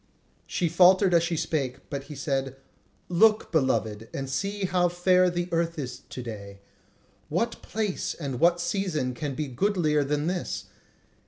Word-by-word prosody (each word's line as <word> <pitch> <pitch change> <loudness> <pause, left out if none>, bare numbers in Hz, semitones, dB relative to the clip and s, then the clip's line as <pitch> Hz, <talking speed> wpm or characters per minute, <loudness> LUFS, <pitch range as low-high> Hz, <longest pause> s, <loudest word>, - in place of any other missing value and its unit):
She 175 - 0
faltered 180 +3 +5
as 170 - +6
she 170 0 -1
spake, 140 -5 -2
but 140 -1 -4
he 150 - -9
said: 135 -1 -2 0.5
"Look, 215 +5 +3
beloved, 110 -8 0
and 135 - -4
see 195 +9 -2
how 180 -1 +2
fair 180 +1 +3
the 175 0 -2
earth 165 0 0
is 125 -4 -5
to 125 - -6
day! 100 -4 -8 0.7
What 230 +9 -1
place 210 -4 -2
and 140 -6 -4
what 170 +2 +4
season 175 -7 -1
can 140 +1 -4
be 150 +1 -2
goodlier 150 - +1
than 145 +1 -1
this? 180 +1 -2
165 Hz, 155 wpm, -27 LUFS, 135-180 Hz, 0.7 s, as